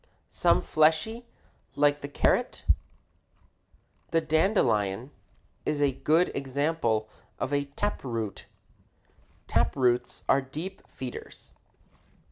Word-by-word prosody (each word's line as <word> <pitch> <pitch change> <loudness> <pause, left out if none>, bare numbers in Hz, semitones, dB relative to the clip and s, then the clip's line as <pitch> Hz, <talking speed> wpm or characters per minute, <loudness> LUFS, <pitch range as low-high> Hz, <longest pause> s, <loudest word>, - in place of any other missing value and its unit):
some - - +3
fleshy 160 +10 +2 0.5
like 145 0 +3
the 140 - -4
carrot? 145 - +1 1.4
The 165 - +3
dandelion 145 - +1 0.5
is 150 - -1
a 145 -1 +3
good 155 +7 +2
example 135 -5 0 0.3
of 140 - -2
a 140 0 +1
tap 175 +9 -3
root. 115 -6 -4 1.0
Tap - - +1
roots 125 -2 +1
are 135 - +4
deep 155 +9 -7
feeders. 130 -2 -9
140 Hz, 95 wpm, -28 LUFS, 125-160 Hz, 1.4 s, are